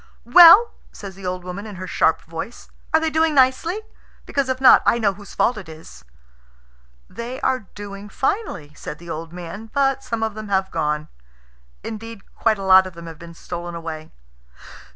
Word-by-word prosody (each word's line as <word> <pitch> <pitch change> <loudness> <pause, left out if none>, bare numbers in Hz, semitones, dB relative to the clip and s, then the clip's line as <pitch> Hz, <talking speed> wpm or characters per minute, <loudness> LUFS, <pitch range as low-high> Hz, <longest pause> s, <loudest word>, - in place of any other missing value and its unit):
"Well," 350 - +9 0.2
says 200 -2 -9
the 190 0 -8
old 180 0 -4
woman 185 +4 -7
in 210 - -9
her 185 +1 -7
sharp 165 -2 +1
voice, 165 +8 -8 0.2
"are 315 - +4
they 320 0 -1
doing 320 0 +2
nicely? 275 +10 +2 0.4
Because 275 -2 -1
if 260 0 -1
not, 265 - +7
I - - +3
know 210 -4 +1
whose 200 +1 -13
fault 240 - +1
it 180 -5 -11
is." 155 - -13 1.0
"They 240 +3 -7
are 255 -6 -1
doing 205 0 -8
finely," 300 - -3
said 150 - -8
the 170 +1 -9
old 165 +1 -6
man; 180 +5 -8
"but 270 -1 +1
some 230 -1 -3
of 220 -1 -1
them 215 0 -8
have 190 -1 0
gone. 150 -1 -2 0.8
Indeed, 225 -1 -8
quite 220 -2 +1
a 195 - -7
lot 190 0 +6
of 185 - -10
them 170 0 -11
have 165 -2 -10
been 170 0 -11
stolen 175 0 -7
away." 160 -2 -7
200 Hz, 185 wpm, -21 LUFS, 170-255 Hz, 1.0 s, Well